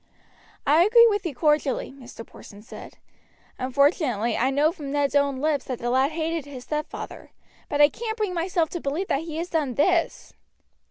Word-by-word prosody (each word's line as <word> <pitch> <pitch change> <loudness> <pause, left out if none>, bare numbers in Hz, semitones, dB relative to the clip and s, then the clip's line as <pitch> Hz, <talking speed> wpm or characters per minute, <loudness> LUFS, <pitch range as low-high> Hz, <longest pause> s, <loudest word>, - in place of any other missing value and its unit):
"I 305 +4 +4
agree 465 +4 +6
with 410 -3 -1
you 295 - -6
cordially," 300 -2 0
Mr. 250 -4 -12
Porson 205 0 -14
said. 235 - -12 0.6
"Unfortunately 255 - +1
I 255 +3 +1
know 290 +4 +2
from 295 -6 -8
Ned's 285 -1 0
own 280 -1 +2
lips 290 0 -1
that 255 - -4
the 240 +1 -3
lad 265 +4 +2
hated 325 -1 -2
his 270 -3 -9
stepfather; 300 +2 -6 0.4
but 290 0 +1
I 290 - +7
can't 440 - -5
bring 420 -4 -2
myself 340 -1 0
to 345 - -5
believe 310 +8 -3
that 275 - 0
he 320 -2 -6
has 340 +2 -4
done 290 -7 -1
this." 335 +3 0
295 Hz, 180 wpm, -24 LUFS, 270-335 Hz, 0.6 s, I